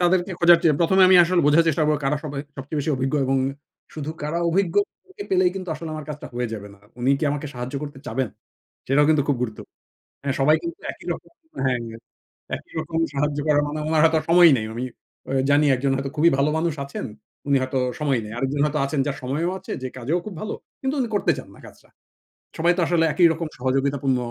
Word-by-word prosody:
তাদেরকে 175 +1 +2
খোঁজার 175 -1 +7
চেয়ে 155 -3 +4
প্রথমে 190 +3 +4
আমি 185 - +7
আসলে 180 +1 +2
বোঝার 160 +3 +5
চেষ্টা 155 0 +1
করবো 150 0 +2
কারা 145 +2 +1
সবাই 140 -2 -4 0.2
সবচেয়ে 140 +3 -4
বেশি 145 - -1
অভিজ্ঞ 135 +3 -1
এবং 135 +1 +2 0.6
শুধু 155 0 -4
কারা 150 +3 -1
অভিজ্ঞকে 205 - -1
পেলেই 370 -1 +4
কিন্তু 185 -1 -6
আসলে 160 +1 -7
আমার 155 -1 -7
কাজটা 150 -1 -6
হয়ে 125 0 -2
যাবে 105 -1 -8
না। - - -22 0.2
উনি 130 +3 +2
কি 155 - -1
আমাকে 145 +1 -3
সাহায্য 125 +3 -6
করতে 145 -2 -7
চাবেন? 125 +1 -1 0.6
সেটাও 145 +2 +4
কিন্তু 155 -2 +3
খুব 145 - +2
গুরুত্বপূর্ণ। 110 -3 -6 0.5
মানে 140 - 0
সবাই 150 +3 +5
কিন্তু 340 +2 -5
একই - - -15
রকম - - -11 0.3
হ্যাঁ 125 -2 +1 0.8
একই - - -19
রকম 160 +1 -4 0.2
সাহায্য 145 +1 -1
করার 145 -1 +4
মানে 150 +1 -4
উনার 155 -1 +3
হয়তো 160 0 +4
সময় 175 0 +8
নেই। 110 - -3
আমি 120 - -4 0.5
আ - - -2 0.2
জানি 145 +1 +4
একজন 135 +2 0
হয়তো 135 0 -4
খুবই 165 +3 +5
ভালো 140 +2 +2
মানুষ 165 -1 0
আছেন, 140 - -6 0.4
উনি 140 -1 +4
হয়তো 130 0 -1 0.2
সময় 140 -5 +1
নেই। 105 - -8
আরেকজন 135 +3 -1
হয়তো 150 0 -1
আছেন 140 +1 -2
যার 140 - -2
সময়ও 155 +8 -1
আছে 190 - -9
যে 130 - -1
কাজেও 140 +8 -1
খুব 215 - -6
ভালো 215 - -3 0.3
কিন্তু 270 +2 -1
উনি 235 - -2
করতে 175 - +2
চান 130 - -8
না - - -17
কাজটা। - - -16 0.7
সবাই 170 +2 +3
তো 180 - +2
আসলে 170 -2 +2
একই 175 -2 +6
রকম 165 0 -4
সহযোগিতাপূর্ণ 135 +1 0
150 Hz, 210 wpm, -23 LUFS, 135-170 Hz, 0.8 s, সময়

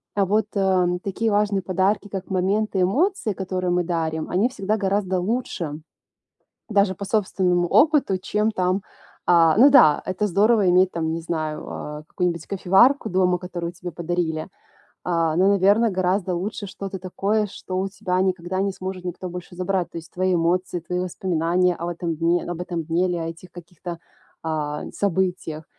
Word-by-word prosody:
а 200 -1 +3
вот, 210 +3 +2
э, 190 -2 +3 0.2
такие 220 +3 -1
важные 205 -1 +1
подарки, 190 +3 0
как 195 -1 -6
моменты 195 +1 0
эмоций, 270 - +1
которые 185 -1 -3
мы 175 0 +2
дарим, 160 -2 -2
они 195 +6 +2
всегда 215 -4 -2
гораздо 195 -2 0
лучше. 180 -7 -3 0.9
Даже 200 -2 +3
по 200 - -7
собственному 185 -4 +1
опыту, 290 - +4
чем 210 +3 0
там 185 0 0 0.4
А, 165 -1 +5
ну 265 +6 +8
да, 240 - +6
это 185 +3 -1
здорово 205 +1 +3
иметь, 185 +1 +4
там, 160 -1 -2
не 165 - -3
знаю, 155 -2 -3
э, 150 0 -7
какую-нибудь 170 -2 -2
кофеварку 195 +8 +3
дома, 180 -1 +2
которую 175 -1 -5
тебе 175 0 -8
подарили. 170 -1 -2 0.6
А, 165 -2 +1
но, 185 +3 +4
наверно, 200 +3 +4
гораздо 185 0 0
лучше 200 +3 -4
что-то 195 0 -6
такое, 200 +4 -1
что 185 -1 -6
у 190 - 0
тебя 190 -2 -2
никогда 185 0 -1
не 200 0 0
сможет 185 -1 -6
никто 180 +1 -5
больше 180 0 -8
забрать. 185 0 -1
То - - -6
есть 165 - -12
твои 185 0 0
эмоции, 175 +1 0
твои 180 +2 -3
воспоминания 180 0 0
об 170 - -4
этом 170 -2 -3
дне 170 +2 +1
об 175 0 -4
этом 175 -2 -3
дне 170 +3 +1
или 180 - -1
об 165 0 -3
этих 165 +2 -10
каких-то, 175 0 -8 0.4
а, 150 -2 -3
событиях. 180 -5 -1
185 Hz, 170 wpm, -23 LUFS, 175-195 Hz, 0.9 s, ну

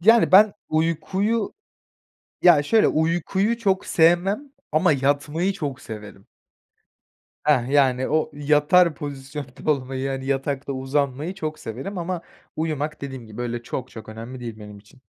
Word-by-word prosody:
Yani 225 +4 +5
ben 205 +2 +8 0.2
uykuyu 190 +7 0 0.9
Ya, 170 -5 +7
şöyle, 220 +9 +4
uykuyu 175 +7 +1
çok 195 -4 0
sevmem 185 - +2 0.2
ama 155 0 +4
yatmayı 145 +6 0
çok 145 -8 -5
severim. 105 -3 -10 1.2
Heh, 130 -5 +3
yani 130 -2 +3
o 155 0 +1
yatar 150 +4 +3
pozisyonda 140 0 -5
olmayı, 135 -2 -1
yani 135 -1 -3
yatakta 140 0 -2
uzanmayı 140 +4 -1
çok 155 -4 -4
severim 135 - -6
ama 175 0 -3 0.3
uyumak 155 -1 -2
dediğim 130 -4 -7
gibi 110 -1 -12
böyle 120 -1 -3
çok 130 +2 -5
çok 110 -2 -11
önemli 115 +4 -8
değil 115 -3 -7
benim 105 -1 -10
için. 105 +6 -21
145 Hz, 135 wpm, -23 LUFS, 130-175 Hz, 1.2 s, ben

